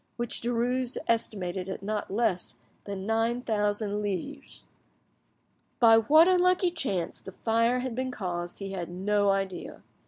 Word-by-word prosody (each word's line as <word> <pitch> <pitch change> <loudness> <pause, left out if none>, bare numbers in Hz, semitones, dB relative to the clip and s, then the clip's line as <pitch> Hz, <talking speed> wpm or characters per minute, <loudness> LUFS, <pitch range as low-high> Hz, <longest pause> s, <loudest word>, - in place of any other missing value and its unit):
which 240 -1 0
Derues 245 +1 0
estimated 195 -5 -1
at 190 - -6
not 210 +1 -3
less 190 - -1 0.3
than 195 -1 -5
nine 225 +3 0
thousand 210 -2 0
livres. 210 - -5 1.2
By 225 -2 +7
what 310 +9 +6
unlucky 365 0 +3
chance 200 - -3
the 190 - -10
fire 230 +4 +1
had 255 -2 -3
been 260 +2 -2
caused 175 -7 -4
he 195 -1 -6
had 175 -3 -4
no 200 +3 +1
idea. 195 -2 -2
215 Hz, 135 wpm, -28 LUFS, 195-245 Hz, 1.2 s, By